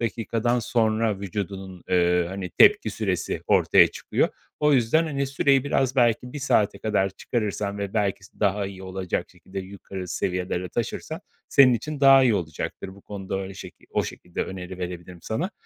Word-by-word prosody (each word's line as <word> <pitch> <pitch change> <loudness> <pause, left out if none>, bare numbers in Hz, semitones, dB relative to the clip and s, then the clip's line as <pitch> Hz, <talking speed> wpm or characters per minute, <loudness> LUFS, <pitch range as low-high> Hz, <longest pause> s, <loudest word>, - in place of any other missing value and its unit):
dakikadan 115 +1 0
sonra 110 -3 +1
vücudunun, 95 -1 -5
eee, 90 -1 +3
hani, 95 -1 -5
tepki - - +5
süresi - - -2
ortaya - - +6
çıkıyor. - - -1 0.3
O 150 0 +4
yüzden, 135 +6 +3
hani, 140 -2 -1
süreyi 135 0 +2
biraz 135 -2 0
belki 120 0 +2
1 145 - -5
saate 105 -7 +2
kadar 100 -2 0
çıkarırsan 105 -1 -3
ve 100 0 -4
belki 100 -2 0
s - - -19
daha 100 -1 +1
iyi 95 -1 -9
olacak 95 -1 -3
şekilde 95 - -9
yukarı 95 -1 -8
seviyelere 90 0 -2
taşırsan - - -4 0.3
senin 130 -3 +6
için 145 +5 -4
daha 135 -1 +8
iyi 115 -4 +4
olacaktır 80 -2 -4
bu 100 - -16
konuda 95 -1 -5
öyle 95 0 -6
şeki - - -11
o - - +1
şekilde 90 - -5
öneri 95 -1 -7
verebilirim 90 0 -6
sana. 155 - -2
100 Hz, 165 wpm, -25 LUFS, 95-120 Hz, 0.3 s, daha